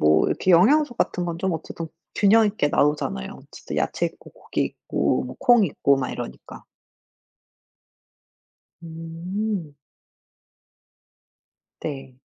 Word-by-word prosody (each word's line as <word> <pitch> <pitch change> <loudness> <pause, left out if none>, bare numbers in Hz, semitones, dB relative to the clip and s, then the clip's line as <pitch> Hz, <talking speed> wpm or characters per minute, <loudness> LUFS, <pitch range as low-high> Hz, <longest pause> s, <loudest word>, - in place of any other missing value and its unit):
뭐 75 +1 +4
이렇게 185 - 0
영양소 240 - +5
같은 180 -5 -1
건 170 -1 -3
좀 190 0 0
어쨌든 165 +1 -5 0.3
균형 215 +2 +5
있게 200 -8 0
나오잖아요. 145 - 0
어쨌든 - - -9
야채 - - 0
있고 - - -11
고기 - - -3
있고 - - -1
뭐 125 - -8
콩 240 -4 +5
있고 140 -3 +2
막 130 - -2
이러니까. 120 - -8 2.2
음. 165 +2 -4 2.1
네. 135 -4 -6
165 Hz, 220 characters per minute, -24 LUFS, 145-200 Hz, 2.2 s, 영양소